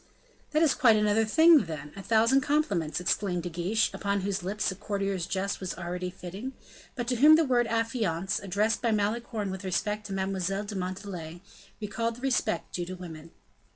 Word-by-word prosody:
"That 305 +1 +2
is 310 - +4
quite 230 -4 +5
another 210 +1 +3
thing, 315 - +6
then; 150 -3 -7
a 195 - -7
thousand 230 +6 +3
compliments," 210 - 0
exclaimed 180 0 0
De 175 - -3
Guiche, 180 +6 0
upon 200 -1 -1
whose 195 0 -2
lips 200 +3 -1
a - - -6
courtier's 195 -3 -2
jest 195 +1 -2
was 185 -2 -4
already 180 +1 -4
fitting, 190 +8 -7 0.4
but 240 -3 -3
to 250 - 0
whom 300 +5 +8
the 320 0 +3
word 245 -3 +2
"affianced," 225 -6 -1
addressed 205 +3 0
by 235 - +1
Malicorne 215 -1 -1
with 190 +1 -6
respect 210 +3 -2
to 195 - -5
Mademoiselle 195 0 -1
de 205 0 -6
Montalais, 180 -3 -5 0.4
recalled 230 +2 -2
the 245 - -13
respect 260 -10 -1
due 175 -1 -3
to 185 - -5
women. 165 -3 -9
200 Hz, 185 wpm, -28 LUFS, 180-230 Hz, 0.4 s, whom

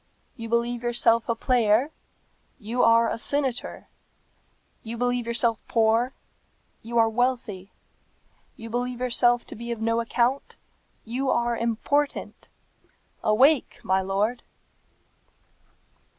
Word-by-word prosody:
You 230 -3 -7
believe 235 +1 0
yourself 235 -1 +2
a 230 - +2
player; 240 +2 +2 0.7
you 235 +3 -2
are 230 0 +5
a 225 - -3
senator. 270 -1 -2 0.9
You 230 +1 -7
believe 245 0 -1
yourself 235 -1 +1
poor; 230 +3 +2 0.7
you 235 +1 -4
are 225 -1 +5
wealthy. 225 -5 -2 0.9
You 225 0 -9
believe 245 +1 -2
yourself 240 -1 +2
to - - -10
be 235 +2 -6
of 235 - -4
no 230 +1 0
account; 240 +3 -1 0.5
you 255 +4 -2
are 235 -1 +1
important. 235 +6 -2 0.8
Awake, 265 +7 +3
my 190 0 +1
lord!" 200 +5 -1
235 Hz, 110 wpm, -25 LUFS, 225-245 Hz, 0.9 s, are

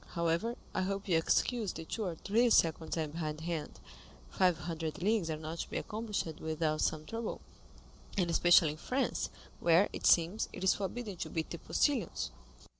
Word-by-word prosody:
However, 170 +8 0 0.2
I - - 0
hope 195 +2 -2
you 180 - +1
will 165 - +5
excuse 225 +4 +1
the 160 - -7
two 220 +5 -3
or 175 -3 -3
three 230 +8 +2
seconds 165 -5 +3
I 160 - +1
am 150 - -6
behindhand; 160 0 -4 0.5
five 180 - +3
hundred 160 -2 -4
leagues 200 -2 +1
are 155 - -2
not 160 +2 -6
to - - -4
be - - -3
accomplished 215 -1 -3
without 155 -1 -1
some 155 -1 0
trouble, 225 +5 -4 0.8
and 180 -3 +2
especially 170 -1 +5
in 150 - -8
France, 260 +11 -1 0.3
where, 170 +4 +4
it - - 0
seems, 175 +6 +4
it - - -6
is 190 - +5
forbidden 205 0 -4
to - - -4
beat 160 -1 -3
the 170 - -5
postilions." 235 - 0
170 Hz, 185 wpm, -33 LUFS, 160-205 Hz, 0.8 s, will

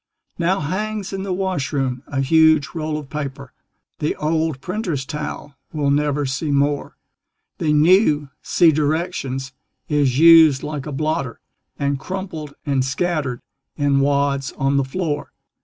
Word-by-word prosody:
Now 180 +2 +1
hangs 200 +5 -3
in 195 - -3
the 195 0 -4
washroom 140 -9 -1
a 135 -1 -2
huge 160 +1 +4
roll 155 -2 -2
of 145 -3 -9
paper 140 -3 -6 0.5
The 150 - -1
old 155 -2 -1
printer's 180 -6 -3
towel 150 0 -6 0.2
we'll 145 -2 +1
never 145 0 +1
see 135 +4 -2
more. 145 0 0 0.6
The 155 - +1
new 150 -2 +4
(see 165 -2 +4
directions) 145 -4 -2 0.4
is 140 -4 +2
"used 160 -3 +7
like 150 -2 -5
a - - -4
blotter," 140 -3 -2 0.4
And 140 -1 -1
crumpled 170 -5 -6
and 135 -3 +1
scattered 140 -2 -2 0.3
in 140 -2 +2
wads 140 -1 +1
on 135 +1 0
the 140 - +3
floor. 145 +1 -3
150 Hz, 140 wpm, -21 LUFS, 140-165 Hz, 0.6 s, used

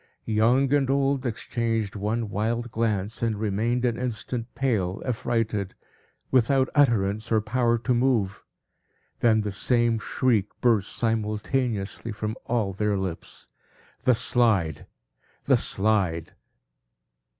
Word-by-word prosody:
Young 120 +5 +2
and 140 -2 +2
old 135 -1 +1
exchanged 115 -2 -2
one 110 +3 -2
wild 115 +3 -2
glance, 110 -2 -1
and 115 -3 -1
remained 110 +4 0
an 120 -1 0
instant, 120 -1 -3
pale, 105 -9 0
affrighted, 110 -5 -1 0.6
without 130 +1 +3
utterance, 110 -6 +2
or 110 - +4
power 120 +2 +1
to 120 +2 0
move. 120 -6 +1 0.8
Then 110 -2 +3
the 105 -1 -3
same 120 +3 +1
shriek 110 -3 +1
burst 110 -5 +2
simultaneously 110 0 -1
from 105 +1 -4
all 110 -5 0
their 105 +1 0
lips. 95 -3 -6 0.6
"The 125 - +4
Slide! 105 - +2 0.6
The - - +4
Slide!" 95 -6 +1
115 Hz, 115 wpm, -25 LUFS, 105-120 Hz, 0.8 s, or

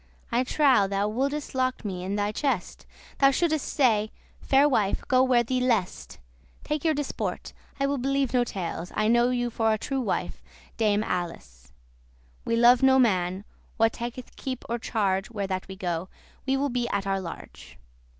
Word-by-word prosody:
I 240 +2 +2
trow 260 -6 +3
thou 200 +1 0
wouldest 280 +6 -2
lock 255 -3 -1
me 185 -3 -4
in 195 +2 -2
thy 205 0 0
chest. 240 -5 -2 0.3
Thou 275 - +6
shouldest 310 +1 0
say, 220 -6 +2 0.3
'Fair 275 +2 +4
wife, 215 -8 +1
go 255 0 +4
where 255 -2 +4
thee 255 +2 -1
lest; 235 -7 -1 0.5
Take 300 -1 -2
your 320 -2 +2
disport; 290 -1 -4 0.3
I 275 - +2
will 280 -1 -1
believe 275 0 0
no 250 -1 +4
tales; 180 -5 -5
I 215 - +1
know 240 +2 +4
you 245 -1 -1
for 225 0 +1
a 215 - +1
true 270 +4 -2
wife, 230 - -3 0.3
Dame 210 -2 +2
Ales.'* - - -7
*Alice 65 - -5 0.7
We 230 - +1
love 240 +2 +6
no 265 0 +5
man, 190 -5 +1 0.3
that 225 0 +4
taketh 240 +1 -7
keep* 260 -2 -5
or 235 +1 -2
charge 195 -4 0
*care - - -18
Where 200 -1 -1
that 185 -1 -4
we 190 - -8
go; 175 -1 -3 0.4
we 270 0 +2
will 280 +1 0
be 245 -1 -1
at 200 -1 -1
our 195 0 0
large. 70 - -10
235 Hz, 185 wpm, -26 LUFS, 195-260 Hz, 0.7 s, Thou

